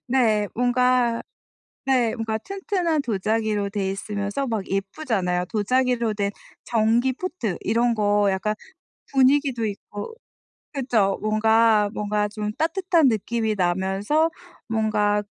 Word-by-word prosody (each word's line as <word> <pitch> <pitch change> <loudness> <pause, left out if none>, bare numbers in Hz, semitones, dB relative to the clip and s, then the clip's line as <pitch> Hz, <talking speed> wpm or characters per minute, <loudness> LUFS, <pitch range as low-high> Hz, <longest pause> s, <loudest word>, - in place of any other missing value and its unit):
네. 225 -5 +2
뭔가 245 -1 +2 0.6
네 250 -4 +2
뭔가 225 -2 -2
튼튼한 370 - -1
도자기로 215 -2 -1
되어 200 -1 -2
있으면서 205 +5 -3
막 220 -5 -3
예쁘잖아요. 195 -3 -1
도자기로 235 +1 +1
된 200 -1 -1 0.3
전기 235 +3 +2
포트 255 - -4
이런 235 +3 +1
거 205 -1 +2
약간 195 +3 -1 0.6
분위기도 270 -2 +3
있고 205 - -6 0.6
그쵸 230 -8 +1
뭔가 215 0 +3
뭔가 210 0 -1
좀 210 0 -4
따뜻한 335 -3 +2
느낌이 220 0 -1
나면서 195 - +1 0.4
뭔가 210 -2 +1
220 Hz, 245 characters per minute, -23 LUFS, 205-255 Hz, 0.6 s, 분위기도